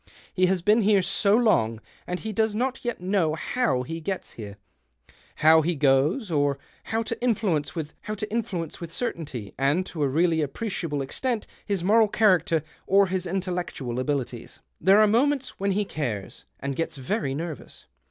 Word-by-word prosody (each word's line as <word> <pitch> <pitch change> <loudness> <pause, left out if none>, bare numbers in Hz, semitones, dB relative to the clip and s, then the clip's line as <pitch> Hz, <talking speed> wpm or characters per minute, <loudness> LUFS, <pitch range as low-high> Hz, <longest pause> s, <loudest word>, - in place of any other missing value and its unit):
He 185 -1 +3
has 185 -2 0
been 215 +4 +4
here 200 -2 +4
so 200 +2 +3
long, 115 - +2 0.3
and 180 0 -3
he 220 0 -4
does 220 0 +1
not 255 +3 -1
yet 240 -6 -3
know 180 -4 +1
how 145 - 0
he 165 +4 -6
gets 190 +3 -4
here, 105 -3 -9 0.8
how 160 +1 +6
he 170 +2 0
goes, 145 - +2
or 145 -2 +2 0.3
how 225 +1 -1
to - - -5
influence 190 -12 0
with 180 0 -4
certainty 145 - -4
and 145 +7 +2
to 160 - -6
a 145 - +3
really 160 +3 +2
appreciable 150 -2 -3
extent 235 - -2 0.2
his 200 -4 -1
moral 220 +3 +5
character 185 -7 +3 0.2
or 200 +1 +5
his 185 -1 -2
intellectual 175 -9 -3
abilities. 130 -3 -3 0.2
There 190 +4 +5
are 215 - +7
moments 270 +5 +1
when 195 0 +1
he 205 +1 0
cares, 120 - -5
and 140 0 -3
gets 165 0 -3
very 135 - -2
nervous. 160 0 -7
180 Hz, 160 wpm, -26 LUFS, 145-210 Hz, 0.8 s, are